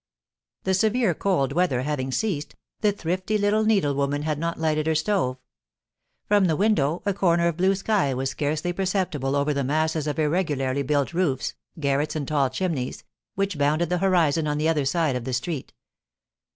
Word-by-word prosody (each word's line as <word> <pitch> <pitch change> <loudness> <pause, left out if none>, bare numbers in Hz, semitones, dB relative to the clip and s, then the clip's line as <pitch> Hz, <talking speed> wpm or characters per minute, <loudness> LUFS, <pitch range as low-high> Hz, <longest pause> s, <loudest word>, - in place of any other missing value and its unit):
The 190 - +1
severe 220 +1 +2
cold 155 -8 0
weather 160 -7 +1
having 135 -2 -2
ceased, 155 -3 -2 0.2
the 210 - +3
thrifty 185 +2 -2
little 210 +1 +2
needlewoman 145 -8 +1
had 155 -1 -1
not 170 +1 -2
lighted 155 -1 0
her 160 - +2
stove. 160 -6 0 0.9
From 205 -2 +4
the 165 -3 +2
window, 175 -5 +1
a 200 - +1
corner 170 -3 +2
of 170 - 0
blue 190 +2 +3
sky 195 -7 +1
was 135 +1 -1
scarcely 155 +5 -2
perceptible 180 -8 -1
over 145 +1 +1
the 140 -1 -1
masses 155 +2 0
of 150 - -2
irregularly 145 -4 0
built 140 +2 0
roofs, 165 -7 0 0.3
garrets, 145 +1 0
and 145 -3 -3
tall 140 -3 +2
chimneys, 130 -2 -3 0.3
which 195 -5 -1
bounded 150 +4 +2
the 180 0 0
horizon 165 -5 +2
on 150 0 0
the 155 +1 +1
other 155 -4 +1
side 155 -1 +1
of 125 - -3
the 130 +1 -4
street. 130 +3 -3
155 Hz, 175 wpm, -24 LUFS, 140-185 Hz, 0.9 s, From